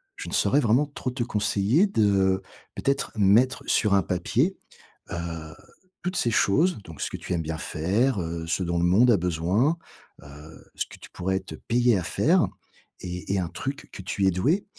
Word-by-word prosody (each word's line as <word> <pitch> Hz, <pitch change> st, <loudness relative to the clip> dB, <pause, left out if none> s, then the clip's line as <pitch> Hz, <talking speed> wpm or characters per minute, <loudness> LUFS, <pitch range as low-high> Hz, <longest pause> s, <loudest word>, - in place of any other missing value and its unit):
je -, -, -7 dB
ne -, -, -8 dB
saurais 145 Hz, -, +3 dB
vraiment 125 Hz, +2 st, +3 dB
trop 140 Hz, -3 st, -5 dB
te 125 Hz, -1 st, -2 dB
conseiller 110 Hz, -, +2 dB
de, 100 Hz, -, +2 dB, 0.3 s
peut-être 140 Hz, 0 st, -1 dB
mettre 110 Hz, +6 st, +3 dB
sur 105 Hz, -2 st, +2 dB
un 95 Hz, -, +3 dB
papier, 120 Hz, -, 0 dB, 0.5 s
heu, 80 Hz, -2 st, -5 dB, 0.5 s
toutes 180 Hz, +1 st, -2 dB
ces 120 Hz, -, +1 dB
choses, 155 Hz, -, +2 dB
donc 80 Hz, -4 st, -12 dB
ce -, -, -2 dB
que -, -, -4 dB
tu -, -, -5 dB
aimes 85 Hz, -, 0 dB
bien 80 Hz, 0 st, -4 dB
faire, 100 Hz, +9 st, 0 dB
heu, 85 Hz, 0 st, -4 dB
ce 90 Hz, +3 st, 0 dB
dont 85 Hz, 0 st, -1 dB
le -, -, 0 dB
monde 110 Hz, +8 st, +5 dB
a 110 Hz, -, +5 dB
besoin, 90 Hz, -, +1 dB, 0.5 s
heu, 75 Hz, +3 st, -13 dB
ce -, -, -1 dB
que -, -, -13 dB
tu -, -, -12 dB
pourrais 95 Hz, +1 st, -1 dB
être 95 Hz, +1 st, -7 dB
payé 120 Hz, -2 st, +3 dB
à -, -, -4 dB
faire, -, -, +2 dB, 0.5 s
et 90 Hz, +1 st, -4 dB
et 100 Hz, -, +1 dB
un 90 Hz, -3 st, -2 dB
truc 135 Hz, +9 st, -6 dB
que -, -, -8 dB
tu 95 Hz, +1 st, -1 dB
es 95 Hz, -, +4 dB
doué, 140 Hz, -, +1 dB
100 Hz, 195 wpm, -25 LUFS, 85-125 Hz, 0.5 s, monde